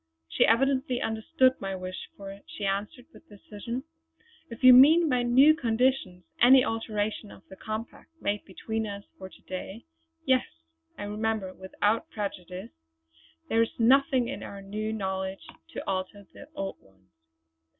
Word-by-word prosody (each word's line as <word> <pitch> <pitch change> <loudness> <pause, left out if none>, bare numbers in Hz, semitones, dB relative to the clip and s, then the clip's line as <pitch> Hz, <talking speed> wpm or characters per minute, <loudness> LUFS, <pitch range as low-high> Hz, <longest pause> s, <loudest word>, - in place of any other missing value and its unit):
She 80 - +2
evidently 260 +2 +2
understood 255 +4 +1
my 195 -1 -3
wish, 185 0 -7
for 195 0 -9
she 205 - -6
answered 200 +5 -3
with - - -18
decision: 215 +4 -7 0.7
"If 230 +1 -10
you 255 0 +10
mean 315 +7 +7
by 250 -4 +1
'new 260 +5 +6
conditions' 240 - 0 0.2
any 255 +2 +7
alteration 215 -1 -3
of - - -15
the 190 - -11
compact 215 +3 -7
made 205 -4 -2
between 220 +3 -4
us 200 0 -7 0.2
for 190 -1 -8
to - - -19
day 190 +4 -7 0.4
yes, 260 -1 +3 0.5
I - - -6
remember 210 -2 -2
'without 205 - -1
prejudice' 185 - -6 0.8
there 225 - +2
is 230 - -1
nothing 260 +1 +4
in 270 - -5
our 200 - -8
new 210 +2 -4
knowledge 190 -2 -4 0.3
to - - -6
alter 190 +1 -3
the 285 - -12
old 195 0 -5
ones. 95 -1 -27
215 Hz, 150 wpm, -28 LUFS, 195-250 Hz, 0.8 s, you